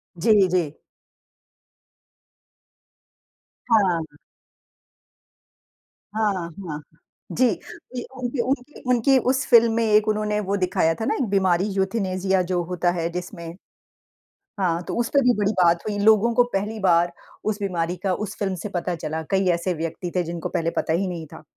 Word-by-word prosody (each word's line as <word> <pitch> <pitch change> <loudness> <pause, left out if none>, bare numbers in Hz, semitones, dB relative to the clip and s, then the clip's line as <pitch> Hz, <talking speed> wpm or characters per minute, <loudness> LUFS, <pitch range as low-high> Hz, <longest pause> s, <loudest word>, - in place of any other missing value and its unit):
जी, 200 +2 +4
जी। 170 -5 -1 2.9
हाँ। 170 -8 +2 2.0
हाँ, 215 -2 +2 0.4
हाँ। 150 0 -5 0.5
जी, 255 - +3 0.7
उनकी 250 0 -3
उनकी 270 +2 -3
उनकी 250 +2 +4
उस 260 0 +1
फ़िल्म 235 -2 +6
में 230 0 +1
एक 215 0 +3
उन्होंने 210 0 0
वो 200 0 -1
दिखाया 180 -3 +1
था - - 0
ना - - +1
एक 265 - 0
बीमारी 190 -2 +2
यूथेनेसिया 190 -1 0
जो 175 -1 +1
होता 175 0 0
है 165 +1 -1
जिसमें। 175 -1 -7 1.0
हाँ, 170 -2 +1
तो - - -5
उसपे 240 +4 +2
भी 245 -1 +4
बड़ी 205 0 +1
बात 170 0 +4
हुई। 205 -1 -2
लोगों 220 +2 +5
को 245 - +6
पहली 210 +3 -2
बार 175 -2 +3 0.4
उस 210 0 -2
बीमारी 175 -2 -1
का 190 -2 +1
उस 200 - -8
फ़िल्म 195 -2 -1
से 210 - -4
पता 175 -1 -2
चला। 160 0 -4
कई 190 -1 +2
ऐसे 175 +1 -2
व्यक्ति 165 +2 -4
थे 180 - +2
जिनको 170 0 -5
पहले 165 0 -1
पता 160 - 0
ही 190 +3 0
नहीं 170 -3 -5
था। - - -11
190 Hz, 150 wpm, -23 LUFS, 170-215 Hz, 2.9 s, फ़िल्म